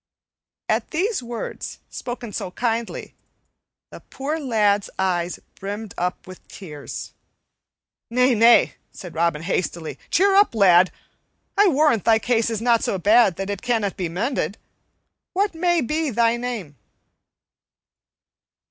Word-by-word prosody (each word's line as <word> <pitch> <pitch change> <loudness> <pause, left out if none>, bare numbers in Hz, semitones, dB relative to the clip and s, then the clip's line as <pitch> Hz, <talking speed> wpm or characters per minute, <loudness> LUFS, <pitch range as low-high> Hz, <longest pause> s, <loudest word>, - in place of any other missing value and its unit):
At - - 0
these 380 - -1
words, 240 -1 -6
spoken 240 -3 -7
so - - -4
kindly, 230 +3 -3 0.8
the - - -10
poor 295 +4 -4
lad's 210 -7 +1
eyes 180 -2 -1
brimmed 205 +1 -6
up 180 +1 -3
with 185 -1 -13
tears. 150 - -8 1.0
"Nay, 250 +2 +3
nay," 230 +1 +5 0.2
said 180 -3 -10
Robin 165 -1 0
hastily, 170 -2 -3
"cheer 390 +2 +3
up, 400 - +4
lad; 185 -3 +5 0.6
I 410 0 +5
warrant 295 - +3
thy 225 -1 +5
case 230 0 +1
is 225 -1 -3
not 235 -1 +3
so 195 - 0
bad 205 0 +4
that 195 +3 -4
it 200 - -5
cannot 225 -6 0
be 180 -3 -3
mended. 200 - -2 0.8
What 395 +1 +1
may 345 0 +1
be 305 +4 -1
thy 230 -1 +2
name?" 235 - -5
225 Hz, 130 wpm, -22 LUFS, 185-250 Hz, 1.0 s, nay